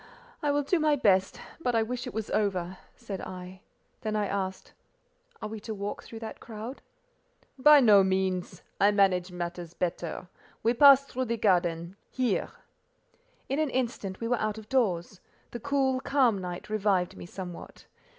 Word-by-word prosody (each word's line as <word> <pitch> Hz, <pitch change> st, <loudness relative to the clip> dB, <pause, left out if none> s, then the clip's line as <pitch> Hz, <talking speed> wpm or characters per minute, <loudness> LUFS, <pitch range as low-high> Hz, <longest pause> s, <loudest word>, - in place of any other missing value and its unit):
"I 295 Hz, -, 0 dB
will 290 Hz, 0 st, +2 dB
do 330 Hz, +5 st, +1 dB
my 305 Hz, -1 st, +3 dB
best, 195 Hz, -7 st, +2 dB, 0.2 s
but 245 Hz, -7 st, 0 dB
I 225 Hz, -, +3 dB
wish 245 Hz, +3 st, -4 dB
it -, -, -5 dB
was 220 Hz, -1 st, -4 dB
over," 185 Hz, -3 st, -1 dB, 0.2 s
said 205 Hz, -6 st, -7 dB
I; 185 Hz, 0 st, -8 dB, 0.4 s
then 215 Hz, -1 st, -2 dB
I 210 Hz, -1 st, +1 dB
asked: 190 Hz, -1 st, -4 dB, 0.7 s
"Are -, -, -2 dB
we 220 Hz, 0 st, -6 dB
to 220 Hz, +1 st, -6 dB
walk 200 Hz, +1 st, -4 dB
through 225 Hz, -, -10 dB
that 220 Hz, -, -7 dB
crowd?" 230 Hz, +4 st, -8 dB, 0.8 s
"By 295 Hz, +2 st, +8 dB
no 205 Hz, -5 st, +7 dB
means: 190 Hz, -1 st, -1 dB, 0.2 s
I 200 Hz, -, +6 dB
manage 190 Hz, -3 st, +2 dB
matters 175 Hz, -1 st, -6 dB
better: 175 Hz, 0 st, -3 dB, 0.4 s
we 230 Hz, -, +3 dB
pass 275 Hz, +1 st, +7 dB
through 260 Hz, -1 st, -3 dB
the 235 Hz, 0 st, -2 dB
garden—here." 180 Hz, +5 st, 0 dB, 1.0 s
In 275 Hz, +3 st, -1 dB
an 310 Hz, -2 st, +1 dB
instant 235 Hz, -7 st, -3 dB
we 230 Hz, -, -3 dB
were 245 Hz, -1 st, 0 dB
out 215 Hz, 0 st, -1 dB
of 215 Hz, -1 st, -10 dB
doors: 195 Hz, -8 st, 0 dB, 0.3 s
the 240 Hz, -, -6 dB
cool, 270 Hz, 0 st, +1 dB
calm 260 Hz, -6 st, +2 dB
night 180 Hz, -1 st, -6 dB
revived 200 Hz, -4 st, +1 dB
me -, -, -9 dB
somewhat. 180 Hz, -2 st, -9 dB
210 Hz, 165 wpm, -28 LUFS, 185-250 Hz, 1.0 s, By